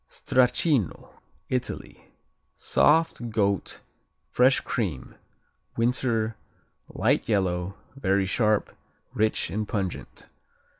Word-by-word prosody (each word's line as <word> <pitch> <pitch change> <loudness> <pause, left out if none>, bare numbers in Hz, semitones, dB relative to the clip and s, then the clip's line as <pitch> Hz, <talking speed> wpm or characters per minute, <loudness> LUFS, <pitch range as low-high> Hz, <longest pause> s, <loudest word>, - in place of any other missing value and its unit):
Stracchino 130 - +1 0.4
Italy 125 -1 -4 0.5
Soft; 155 -6 +2
goat; 100 -3 -1 0.5
fresh 130 +2 +4
cream; 90 - -3 0.6
winter; 115 -2 0 0.5
light - - 0
yellow; 95 -2 0 0.2
very 100 -6 +1
sharp, 105 +2 +1 0.4
rich 110 +1 0
and 105 +1 -2
pungent. 95 -5 -4
110 Hz, 80 wpm, -26 LUFS, 100-125 Hz, 0.6 s, fresh